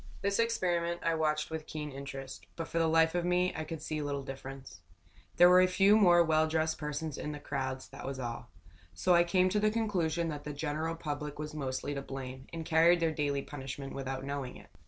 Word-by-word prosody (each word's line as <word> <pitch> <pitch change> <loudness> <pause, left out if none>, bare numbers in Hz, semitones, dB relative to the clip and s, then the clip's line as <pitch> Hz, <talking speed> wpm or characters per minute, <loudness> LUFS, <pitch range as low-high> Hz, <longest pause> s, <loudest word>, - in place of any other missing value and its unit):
This 200 +1 +1
experiment 175 -7 0
I 165 - +2
watched 155 -1 0
with 160 -1 -5
keen 150 -1 -5
interest, 135 0 -8
but 165 -1 -4
for 165 - -1
the 165 - +3
life 160 0 +4
of 175 -1 0
me 180 +1 +2
I 160 - -3
could 155 -1 -6
see 155 -1 -3
little 140 -1 -3
difference. 135 -7 -9 0.6
There 175 - +9
were 180 +1 +7
a 185 - +5
few 195 +3 +5
more 175 -5 +6
well 160 -1 +3
dressed 160 0 0
persons 150 0 -4
in 150 - -4
the 150 - -7
crowds, 130 -2 -4
that - - -8
was 135 -1 -4
all. 120 -2 -5 0.5
So 180 - +3
I 170 0 +6
came 185 +1 +3
to 210 +3 +1
the 215 +1 +3
conclusion 180 -7 0
that 145 -2 -5
the 150 - -5
general 155 +2 -2
public 150 -2 -5
was 150 0 -5
mostly 140 -1 -3
to 140 - -3
blame, 130 -1 -7
and 165 -1 -5
carried 170 +2 +5
their 165 -1 +2
daily 145 -2 -1
punishment 135 -1 -7
without 135 -1 -4
knowing 140 -2 -4
it. - - -16
155 Hz, 220 wpm, -31 LUFS, 140-170 Hz, 0.6 s, There